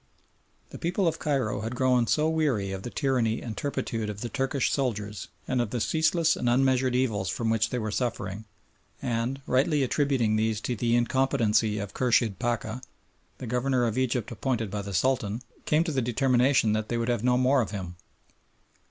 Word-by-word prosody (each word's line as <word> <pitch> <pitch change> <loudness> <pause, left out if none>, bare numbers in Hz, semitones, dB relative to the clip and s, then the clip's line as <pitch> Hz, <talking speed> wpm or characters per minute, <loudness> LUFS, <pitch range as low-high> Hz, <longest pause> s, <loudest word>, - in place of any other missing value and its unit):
The - - -9
people 175 +2 0
of 165 0 -1
Cairo 130 -9 -1
had 115 +3 -4
grown 125 -2 +2
so 155 +5 +2
weary 145 -12 0
of 95 -1 -4
the 120 - -6
tyranny 125 -5 0
and 115 -3 -6
turpitude 115 -4 -3
of 105 0 -6
the 120 - -3
Turkish 135 0 0
soldiers 105 -6 -2 0.2
and 130 -1 +1
of 120 - -2
the 120 - -2
ceaseless 160 +4 +2
and 120 - -1
unmeasured 130 0 +2
evils 110 -7 0
from 110 +4 -1
which 115 0 +1
they 125 - -2
were 110 -2 -2
suffering, 110 -3 -3 0.5
and, 125 +2 -2
rightly 140 +3 +2
attributing 130 -5 +1
these 110 -1 0
to 125 - -2
the 120 +1 +1
incompetency 120 -4 +2
of 100 -1 -5
Khurshid 115 -5 +1
Pacha, 120 0 -2 0.6
the - - -7
Governor 125 +1 +1
of 115 -2 -1
Egypt 125 -3 -1
appointed 115 -2 -2
by 105 0 -2
the 100 -1 -5
Sultan, 115 +1 0 0.2
came 155 +2 +3
to 170 - -3
the 135 -3 0
determination 125 -1 +2
that 110 0 -2
they 120 - 0
would 115 0 -1
have 120 -3 0
no 125 0 +3
more 130 +1 +3
of 110 - -3
him. 95 -4 -6
120 Hz, 185 wpm, -27 LUFS, 110-135 Hz, 0.6 s, came